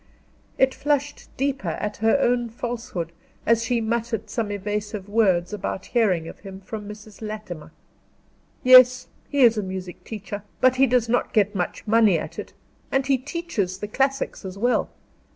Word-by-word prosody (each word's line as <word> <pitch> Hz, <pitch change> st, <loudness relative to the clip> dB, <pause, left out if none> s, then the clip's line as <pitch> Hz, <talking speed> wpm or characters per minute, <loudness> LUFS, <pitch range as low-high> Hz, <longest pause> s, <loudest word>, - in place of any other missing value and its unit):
It 265 Hz, 0 st, +4 dB
flushed 290 Hz, 0 st, -1 dB
deeper 270 Hz, -6 st, -1 dB
at 210 Hz, +6 st, -3 dB
her 225 Hz, +5 st, +3 dB
own 240 Hz, -2 st, +1 dB
falsehood, 225 Hz, -8 st, -4 dB, 0.3 s
as 230 Hz, 0 st, +3 dB
she 235 Hz, 0 st, +1 dB
muttered 225 Hz, -1 st, -2 dB
some 225 Hz, -3 st, -1 dB
evasive 205 Hz, 0 st, -4 dB
words 200 Hz, -4 st, +2 dB
about 195 Hz, -2 st, -4 dB
hearing 190 Hz, -9 st, +2 dB
of -, -, -10 dB
him 195 Hz, -1 st, -9 dB
from 210 Hz, +1 st, -7 dB
Mrs. 210 Hz, 0 st, -11 dB
Latimer. 215 Hz, -7 st, -7 dB, 0.9 s
"Yes, 255 Hz, 0 st, +7 dB, 0.2 s
he 285 Hz, -, +1 dB
is 230 Hz, -3 st, +6 dB
a -, -, 0 dB
music 185 Hz, -2 st, -6 dB
master; 205 Hz, -1 st, -5 dB, 0.2 s
but 255 Hz, 0 st, +4 dB
he 270 Hz, +1 st, +5 dB
does 245 Hz, -1 st, +2 dB
not 245 Hz, +2 st, 0 dB
get 205 Hz, -2 st, +3 dB
much 180 Hz, -3 st, -3 dB
money 215 Hz, -4 st, +4 dB
at -, -, -6 dB
it, -, -, -7 dB, 0.4 s
and 270 Hz, 0 st, +1 dB
he 270 Hz, -1 st, +2 dB
teaches 255 Hz, -, -3 dB
the 210 Hz, -, -5 dB
classics 270 Hz, +4 st, -1 dB
as 190 Hz, 0 st, -7 dB
well. 245 Hz, +4 st, +1 dB
220 Hz, 165 wpm, -24 LUFS, 200-250 Hz, 0.9 s, Yes